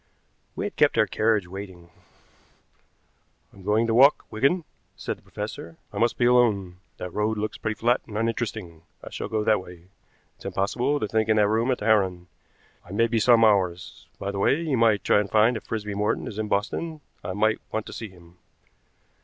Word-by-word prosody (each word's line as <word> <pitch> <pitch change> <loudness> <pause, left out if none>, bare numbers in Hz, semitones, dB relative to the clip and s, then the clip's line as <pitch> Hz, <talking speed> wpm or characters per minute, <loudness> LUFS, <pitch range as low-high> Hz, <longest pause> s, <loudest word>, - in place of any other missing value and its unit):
We - - -3
had - - -5
kept - - +3
our - - +5
carriage 110 -3 +1
waiting. 90 -2 -9 1.6
"I'm 100 - -15
going 105 +4 +2
to 115 - 0
walk, 135 +5 +5
Wigan," 140 +11 +1 0.3
said - - -4
the - - -24
professor. 85 0 -7 0.2
"I - - -4
must 120 0 +1
be 120 - +2
alone. 105 -7 +2 0.2
That 90 -1 -7
road 105 +1 0
looks 105 0 -4
pretty 110 -1 -2
flat 120 +4 +1
and 105 -2 -6
uninteresting; 110 -7 -3 0.2
I - - -9
shall - - -5
go 110 -1 -1
that 105 -2 +2
way. 90 0 -14 0.5
It's - - -17
impossible 125 +9 0
to 105 - -2
think 110 +1 0
in 110 - +4
that 105 -1 +4
room 115 +4 +1
at 130 - +1
the 105 - -6
Heron. 95 -5 +1 0.5
I 90 - -14
may 115 +3 +3
be 115 0 0
some 115 +1 +5
hours. 95 -3 0
By 100 - -4
the 100 - -4
way, 135 +9 +3
you 155 -5 -1
might 115 -3 +3
try - - +4
and 100 -1 -2
find 110 +3 +4
out 110 - -4
if - - -25
Frisby 105 -2 -3
Morton 105 +1 -1
is 105 - -6
in 110 - -2
Boston. 150 +11 -2 0.2
I - - -4
might 110 +2 +1
want 110 0 -2
to - - -9
see 110 - -6
him." 90 -1 -19
110 Hz, 205 wpm, -25 LUFS, 100-115 Hz, 1.6 s, our